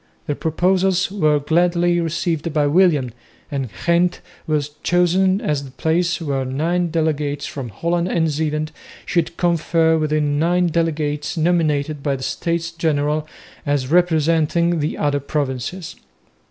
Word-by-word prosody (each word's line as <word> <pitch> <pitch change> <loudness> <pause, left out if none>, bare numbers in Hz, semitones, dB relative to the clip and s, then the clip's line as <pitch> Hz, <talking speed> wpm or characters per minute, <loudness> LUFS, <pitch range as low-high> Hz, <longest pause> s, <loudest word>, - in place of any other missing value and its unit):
The 145 - -1
proposals 185 +4 +1
were 155 -7 +2
gladly 175 +3 +2
received 165 0 -2
by 150 -1 +1
William, 150 -5 +3 0.4
and 135 -4 -2 0.2
Ghent 175 +1 +2 0.3
was 150 -2 0
chosen 185 +2 +2
as 150 -7 -1
the 135 - -9
place 170 +6 0
where 140 -5 -2
nine 165 +7 -1
delegates 150 -3 -1
from 135 -4 -6
Holland 170 - -1
and 165 -3 +1
Zeeland 155 0 -2 0.3
should 170 -1 -1
confer 165 -1 +2
with 155 -1 -1
nine 155 +4 +2
delegates 155 -1 -1
nominated 155 -3 +1
by 140 -1 0
the 130 - -7
States 170 +2 -2
General 155 -2 0 0.4
as 145 -2 -1
representing 165 0 +2
the 150 +1 -2
other 145 -1 +1
provinces. 140 +4 -3
160 Hz, 130 wpm, -20 LUFS, 145-170 Hz, 0.4 s, William